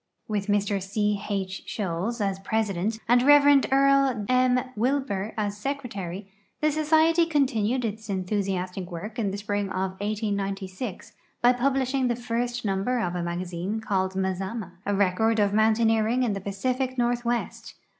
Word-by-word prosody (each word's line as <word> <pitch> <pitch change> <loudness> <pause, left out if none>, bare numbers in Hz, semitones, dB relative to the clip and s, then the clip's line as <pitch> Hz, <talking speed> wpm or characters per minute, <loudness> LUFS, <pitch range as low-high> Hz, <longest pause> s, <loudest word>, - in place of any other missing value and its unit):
With 210 -2 -2
Mr 205 -1 +1
C. 205 +1 -1
H. 190 -2 -3
Sholes 205 +4 -3
as 195 -1 -1
president 210 0 -1
and 245 +1 +5
Rev. 285 0 +6
Earl 275 -4 +3
M. 255 0 +3
Wilbur 225 -4 -1
as 205 -1 -2
secre 280 -2 -2
tary, 190 0 -6 0.3
the 305 0 +2
society 315 +2 +3
continued 255 -5 +1
its 220 0 -5
enthusiastic 185 -1 -2
work 210 +7 -6
in 210 -3 0
the 195 - -4
spring 205 0 -2
of 190 0 -2
1896 200 -1 -3 0.3
by 245 +1 +6
publishing 265 +1 +1
the 240 - +1
first 240 0 -3
number 200 +6 0
of 180 -5 -1
a 180 - -2
magazine 175 +4 -3
called 190 -4 -1
Mazama, 190 +1 -3 0.2
a 205 - +1
record 205 +3 +2
of 205 -1 +2
mountaineering 225 +2 +3
In 230 -4 +1
the 195 - -4
Pacific 255 +7 -2
northwest. 240 0 -1
215 Hz, 145 wpm, -26 LUFS, 195-250 Hz, 0.3 s, Rev